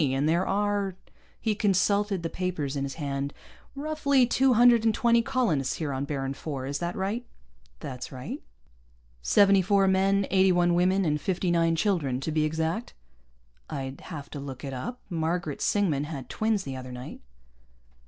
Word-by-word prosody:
And 135 0 +1
there 170 +4 +2
are 200 -1 0 0.2
" - - -32
he 220 -2 0
consulted 200 -1 +1
the 165 - -2
papers 165 -7 -2
in 140 -1 -1
his 135 - -6
hand 140 -2 -3 0.4
"roughly 280 -3 +2
two 260 +2 +3
hundred 240 -1 +6
and 225 -2 +2
twenty 235 -1 +4
colonists 230 - 0
here 150 -4 -3
on 135 +1 -2
Baron 135 -2 -3
IV. 135 -1 -5
Is 140 +1 -2
that 175 +1 -3
right?" 205 +6 -2 0.6
"That's 125 -1 -6
right." 130 -1 -6 0.8
"Seventy 195 - +5
four 195 +1 +3
men, 195 +1 +3
eighty 190 0 +5
one 175 -1 +3
women, 185 +2 +3
and 150 -1 0
fifty 185 0 0
nine 165 -1 +3
children, 160 - 0
to 160 - -2
be 155 0 +2
exact?" 160 +8 -2 0.7
"I'd 135 0 -5
have 145 -5 -8
to 145 - -6
look 135 -2 -7
it 135 -1 -5
up. 240 - -5
Margaret 165 -3 -2
Singman 160 -9 +1
had 145 -4 -7
twins 220 -2 0
the 135 -1 -5
other 130 -1 -7
night." 125 0 -8
175 Hz, 175 wpm, -27 LUFS, 140-200 Hz, 0.8 s, hundred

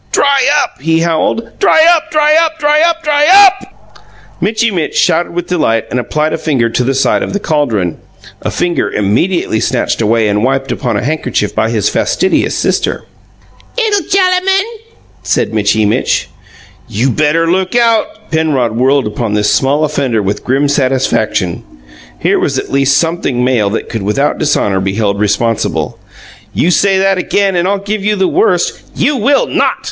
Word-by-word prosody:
"Dry 275 -2 +2 0.2
up!" - - -8
he 165 +2 +1
howled. 170 +7 -2
"Dry 320 -5 +4
up, 330 0 -4
dry 305 -1 +2
up, 320 0 -2
dry 300 0 +2
up, 335 0 +1
dry 295 -1 +2
UP!" 390 0 +3 0.4
Mitchy 220 +1 0
Mitch 170 -5 -3
shouted 175 - +1
with 175 0 -4
delight 115 -12 0
and 125 - -1
applied 150 +6 -2
a - - -2
finger 135 -8 0
to 125 - 0
the 135 +2 -1
side 135 - +1
of - - -4
the 205 - -1
caldron 115 - -1 0.4
a - - -2
finger 175 -1 -1
immediately 110 - 0
snatched 125 -1 -1
away 110 0 +1
and 105 +1 0
wiped 135 +1 -1
upon 125 - -2
a - - -3
handkerchief 155 +5 -2
by - - 0
his - - 0
fastidious - - 0
sister. - - -1 0.7
"'Ittle 415 -7 0
gellamun!" 385 +1 +2 0.6
said - - -1
Mitchy 105 0 +1
Mitch. 105 - 0 0.6
"You 120 +6 -1
better 155 +5 +1
look 185 +3 -1
out!" 230 -2 0
Penrod 150 -7 0
whirled 135 +3 +2
upon 105 0 -3
this 105 0 +1
small 140 +3 +1
offender 135 -7 -1
with 100 +2 -3
grim 135 +3 +1
satisfaction. 130 - 0 0.5
Here - - +1
was - - -1
at - - -5
least 135 0 +2
something 165 -7 -1
male 120 -5 +1
that 110 - -4
could 115 - -5
without 105 +9 -1
dishonour 105 -10 0
be 95 +1 -2
held 100 -2 -1
responsible. 110 +2 -1 0.6
"You 175 - +2
say 195 +2 +2
that 195 0 +1
again, 195 +1 0
and 175 +1 +1
I'll 200 +1 +1
give 200 +1 -4
you 210 +1 +1
the 190 -2 +1
worst 420 +5 0
" - - -27
"You 295 - +1
will 275 +5 +2
NOT!" - - 0
155 Hz, 175 wpm, -12 LUFS, -, 0.7 s, Dry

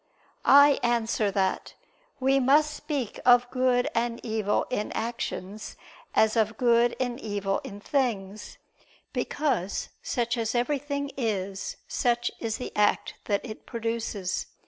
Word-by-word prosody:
I 285 0 +7
answer 230 -3 +1
that, 190 -1 -1 0.4
We 270 +1 +3
must 295 +4 +4
speak 290 -7 -4
of 245 0 +6
good 255 -1 +2
and 235 0 -1
evil 220 -2 0
in 210 -4 -2
actions 215 -3 -4 0.4
as 220 +1 +4
of 220 -1 +1
good 235 -1 +3
and 245 -1 -2
evil 205 -4 -2
in 200 - -8
things: 215 -5 -2 0.6
because 235 - -1
such 235 0 -1
as 225 +1 -1
everything 280 +2 -1
is, 200 -5 -2
such 240 -1 0
is 225 -2 -2
the 250 - -7
act 210 0 +2
that 200 +2 0
it 215 -3 -9
produces. 225 -5 -3
235 Hz, 125 wpm, -27 LUFS, 210-255 Hz, 0.6 s, I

